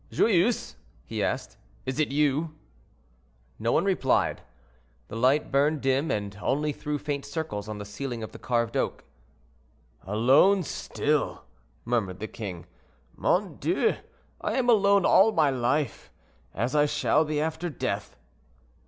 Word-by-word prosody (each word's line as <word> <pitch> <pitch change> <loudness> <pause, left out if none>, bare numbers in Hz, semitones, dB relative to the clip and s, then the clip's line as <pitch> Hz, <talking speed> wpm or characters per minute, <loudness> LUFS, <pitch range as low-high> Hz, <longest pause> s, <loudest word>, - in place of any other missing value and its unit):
"Joyeuse," 215 +2 +2 0.3
he - - -3
asked; - - -3 0.3
"is 130 +3 -3
it 155 - +3
you?" 150 +2 +1 1.0
No 115 +2 0
one 165 - +2
replied. 185 -9 +1 0.7
The - - -7
light 130 +6 +2
burned 145 +2 +2
dim, 135 +4 +1
and 100 -1 -3
only 150 +2 0
threw 150 +1 -3
faint 145 -1 -3
circles 140 -9 -4
on 105 - -5
the 105 - -6
ceiling 115 +3 -5
of 110 - -7
carved 115 -2 0
oak. - - -1 1.0
"Alone, 130 - +4
still!" 150 -1 -1 0.4
murmured 105 -7 -1
the 110 - -4
king. 95 -8 -7 0.5
"Mon - - 0
Dieu! - - +1 0.5
I - - -1
am 245 -2 +3
alone 200 -3 +4
all 205 +4 +6
my 150 -3 +3
life, 130 - -1 0.4
as 120 +7 -2
I 150 0 +4
shall 150 +1 +2
be 150 -1 -2
after 160 +3 -2
death." 145 - -4
140 Hz, 135 wpm, -27 LUFS, 115-155 Hz, 1.0 s, all